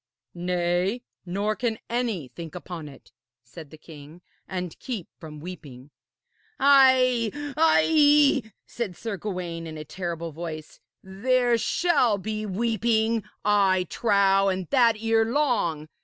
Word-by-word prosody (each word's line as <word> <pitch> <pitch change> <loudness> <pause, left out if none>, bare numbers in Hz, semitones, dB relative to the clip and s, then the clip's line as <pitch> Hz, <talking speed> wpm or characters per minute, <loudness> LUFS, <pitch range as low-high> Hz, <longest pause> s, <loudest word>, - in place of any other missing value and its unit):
'Nay, 180 +5 -1 0.2
nor 200 +4 -1
can 230 -2 -2
any 230 - -2
think 165 +3 -9
upon 170 -2 -7
it,' 135 - -17 0.3
said 145 +6 -12
the 155 - -13
king, 155 +2 -14 0.2
'and 180 -3 -5
keep 230 -10 -5
from 155 -2 -10
weeping.' 145 -6 -10 0.7
'Ay, 260 -4 +5 0.3
ay,' 300 -3 +4 0.2
said 220 -7 -5
Sir 225 -3 -4
Gawaine 175 -5 -5
in 160 -1 -8
a 155 - -7
terrible 170 -1 -5
voice, 155 -1 -8 0.2
'there 240 +6 +1
shall 255 - +2
be 215 +2 -4
weeping, 225 +2 0 0.2
I 195 -3 +3
trow, 195 -3 +3
and 185 -1 -3
that 240 -4 +4
erelong. 225 - +1
195 Hz, 120 wpm, -25 LUFS, 170-235 Hz, 0.7 s, Ay